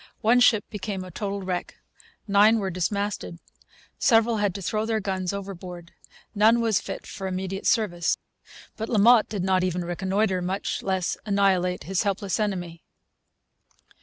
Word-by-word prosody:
One 240 Hz, +2 st, +4 dB
ship 225 Hz, -4 st, +4 dB
became 195 Hz, -2 st, -4 dB
a 185 Hz, -, -10 dB
total 200 Hz, +2 st, -4 dB
wreck. 180 Hz, -1 st, -4 dB, 0.5 s
Nine 210 Hz, +3 st, +5 dB
were 195 Hz, -3 st, -2 dB
dismasted. 200 Hz, 0 st, -2 dB, 0.6 s
Several 225 Hz, -1 st, +4 dB
had 205 Hz, -3 st, 0 dB
to 200 Hz, -, -5 dB
throw 215 Hz, +4 st, -1 dB
their 225 Hz, -1 st, 0 dB
guns 190 Hz, -2 st, -2 dB
overboard. 185 Hz, -3 st, -7 dB, 0.4 s
None 220 Hz, +2 st, +4 dB
was 225 Hz, -4 st, +1 dB
fit -, -, -7 dB
for 195 Hz, -, -6 dB
immediate 190 Hz, +1 st, -3 dB
service. 175 Hz, -8 st, +1 dB, 0.6 s
But 220 Hz, -, -4 dB
La 225 Hz, -, +1 dB
Motte 225 Hz, +2 st, +6 dB
did 205 Hz, -4 st, -3 dB
not 185 Hz, -1 st, +2 dB
even 180 Hz, -1 st, -1 dB
reconnoitre, 190 Hz, +2 st, 0 dB
much 185 Hz, +2 st, -2 dB
less 190 Hz, -2 st, -1 dB
annihilate, 190 Hz, -3 st, +1 dB
his 190 Hz, 0 st, -1 dB
helpless 200 Hz, 0 st, -1 dB
enemy. 175 Hz, -5 st, -3 dB
195 Hz, 150 wpm, -25 LUFS, 185-215 Hz, 0.6 s, Motte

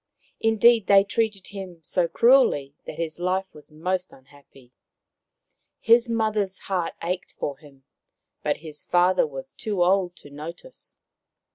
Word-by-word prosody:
Indeed, 225 Hz, -1 st, +4 dB
they 195 Hz, -1 st, +7 dB
treated 210 Hz, -2 st, -2 dB
him 190 Hz, -3 st, -8 dB
so 175 Hz, +3 st, 0 dB
cruelly 230 Hz, -, +3 dB
that -, -, -6 dB
his 165 Hz, 0 st, -4 dB
life 185 Hz, +2 st, 0 dB
was 150 Hz, -, -14 dB
most 180 Hz, +4 st, -3 dB
unhappy. 135 Hz, -2 st, -20 dB, 1.1 s
His 235 Hz, +1 st, +4 dB
mother's 215 Hz, -4 st, 0 dB
heart 180 Hz, -4 st, -3 dB
ached 180 Hz, +1 st, -3 dB
for 140 Hz, -1 st, -5 dB
him, 140 Hz, -3 st, -18 dB, 0.6 s
but 150 Hz, -, 0 dB
his 150 Hz, -2 st, -3 dB
father 180 Hz, -1 st, +3 dB
was 135 Hz, -2 st, -8 dB
too 205 Hz, -5 st, -1 dB
old 180 Hz, -1 st, +2 dB
to 145 Hz, -, -15 dB
notice. 165 Hz, -, -10 dB
180 Hz, 135 wpm, -24 LUFS, 150-205 Hz, 1.1 s, they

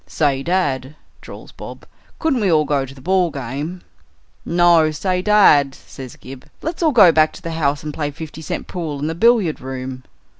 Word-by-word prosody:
"Say, 140 Hz, -4 st, 0 dB
dad," 145 Hz, -5 st, -1 dB, 0.3 s
drawls -, -, -12 dB
Bob, -, -, -11 dB, 0.3 s
"couldn't 315 Hz, -6 st, 0 dB
we 195 Hz, -4 st, +2 dB
all 155 Hz, -2 st, +3 dB
go 140 Hz, -2 st, -1 dB
to 135 Hz, -, -12 dB
the 130 Hz, -, -14 dB
ball 185 Hz, +2 st, +1 dB
game?" 145 Hz, +6 st, -6 dB, 0.6 s
"No. 170 Hz, -2 st, +4 dB
Say, 180 Hz, +4 st, -2 dB
dad," 170 Hz, -10 st, +4 dB
says 130 Hz, -3 st, -11 dB
Gib, 130 Hz, 0 st, -12 dB
"let's 325 Hz, +3 st, -4 dB
all 320 Hz, -2 st, +3 dB
go 205 Hz, -9 st, +7 dB
back 155 Hz, -1 st, +3 dB
to -, -, -12 dB
the 165 Hz, -, -4 dB
house 150 Hz, -3 st, -1 dB
and 150 Hz, -1 st, -5 dB
play 145 Hz, -1 st, -3 dB
five 155 Hz, +1 st, -9 dB
cent 155 Hz, -, -5 dB
pool 165 Hz, -5 st, -5 dB
in 140 Hz, -, -4 dB
the 160 Hz, -, -2 dB
billiard 215 Hz, -3 st, +2 dB
room." 130 Hz, 0 st, -6 dB
155 Hz, 190 wpm, -19 LUFS, 140-180 Hz, 0.6 s, go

